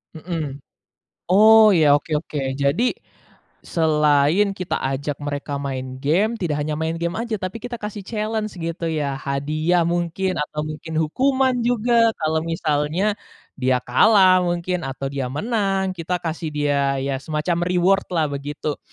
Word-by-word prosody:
Mhm, 155 Hz, -4 st, -4 dB, 0.7 s
oh 215 Hz, +3 st, +7 dB
ya 160 Hz, -7 st, +5 dB
oke 150 Hz, +1 st, -2 dB
oke 150 Hz, -1 st, -4 dB, 0.2 s
jadi, 140 Hz, -, +1 dB, 0.7 s
selain 155 Hz, +4 st, +2 dB
kita 185 Hz, -1 st, -2 dB, 0.2 s
ajak 140 Hz, +1 st, -3 dB
mereka 145 Hz, 0 st, -4 dB
main 130 Hz, -2 st, -5 dB
game 180 Hz, +11 st, +2 dB
tidak 165 Hz, -8 st, -2 dB
hanya 150 Hz, +1 st, -2 dB
main 160 Hz, +1 st, -2 dB
game 170 Hz, 0 st, -1 dB
aja 230 Hz, 0 st, -3 dB
tapi 185 Hz, +4 st, -4 dB
kita 245 Hz, 0 st, -5 dB
kasih 210 Hz, 0 st, -5 dB
challenge 215 Hz, -1 st, -3 dB
gitu 165 Hz, +1 st, -4 dB
ya 150 Hz, -3 st, -1 dB
hadiah 150 Hz, +6 st, 0 dB
mungkin 175 Hz, +2 st, -1 dB
atau 150 Hz, 0 st, -3 dB
mungkin 155 Hz, +1 st, -7 dB
hukuman 260 Hz, -, +1 dB
juga 235 Hz, -1 st, +3 dB
kalau 155 Hz, 0 st, 0 dB
misalnya, 165 Hz, +5 st, 0 dB, 0.4 s
dia 130 Hz, -1 st, +2 dB
kalah 185 Hz, -, +5 dB
mungkin 175 Hz, -1 st, -2 dB
atau 135 Hz, 0 st, -5 dB
dia 135 Hz, -1 st, -3 dB
menang 195 Hz, -, -1 dB
kita 175 Hz, +2 st, -2 dB
kasih 165 Hz, -1 st, -3 dB
dia 140 Hz, -2 st, +1 dB
ya 135 Hz, 0 st, -2 dB
semacam 155 Hz, +2 st, -1 dB
reward-lah 180 Hz, -2 st, +1 dB
begitu, 145 Hz, +1 st, -4 dB
165 Hz, 140 wpm, -22 LUFS, 145-195 Hz, 0.7 s, oh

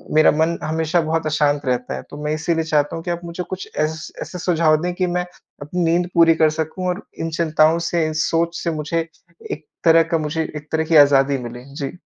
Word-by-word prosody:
मेरा 155 Hz, -, +6 dB
मन 160 Hz, +2 st, +1 dB
हमेशा 160 Hz, +2 st, 0 dB
बहुत 160 Hz, +1 st, -1 dB
अशांत 145 Hz, -2 st, +1 dB
रहता 125 Hz, -1 st, -1 dB
है। -, -, -5 dB
तो 145 Hz, -, -9 dB
मैं 150 Hz, +1 st, -1 dB
इसीलिए 165 Hz, +1 st, 0 dB
चाहता 150 Hz, -2 st, 0 dB
हूँ 165 Hz, -, -6 dB
कि 175 Hz, -, -2 dB
आप 170 Hz, 0 st, -3 dB
मुझे 170 Hz, +1 st, -5 dB
कुछ 185 Hz, 0 st, -6 dB
एस 155 Hz, +1 st, -2 dB
ऐसे 180 Hz, -, -6 dB
सुझाव 165 Hz, -3 st, +3 dB
दें 180 Hz, 0 st, -2 dB
कि 185 Hz, -1 st, 0 dB
मैं 180 Hz, 0 st, -1 dB, 0.4 s
अपनी 175 Hz, +5 st, -2 dB
नींद 175 Hz, +2 st, +1 dB
पूरी 165 Hz, -1 st, +5 dB
कर 160 Hz, -1 st, +4 dB
सकूँ 160 Hz, +4 st, -3 dB
और 180 Hz, +3 st, -2 dB, 0.2 s
इन 165 Hz, -, -2 dB
चिंताओं 160 Hz, 0 st, +3 dB
से 170 Hz, -2 st, +1 dB
इन 155 Hz, -, -2 dB
सोच 170 Hz, +1 st, 0 dB
से 170 Hz, -, 0 dB
मुझे 160 Hz, +2 st, -2 dB, 0.4 s
एक 150 Hz, 0 st, -6 dB, 0.2 s
तरह 165 Hz, 0 st, +6 dB
का -, -, +4 dB
मुझे 155 Hz, +1 st, -2 dB
एक 150 Hz, 0 st, -9 dB
तरह 160 Hz, 0 st, +1 dB
की 160 Hz, 0 st, +1 dB
आज़ादी 140 Hz, -1 st, +5 dB
मिले। 120 Hz, +1 st, -9 dB
जी। 140 Hz, -2 st, -4 dB
160 Hz, 225 wpm, -20 LUFS, 155-170 Hz, 0.4 s, मेरा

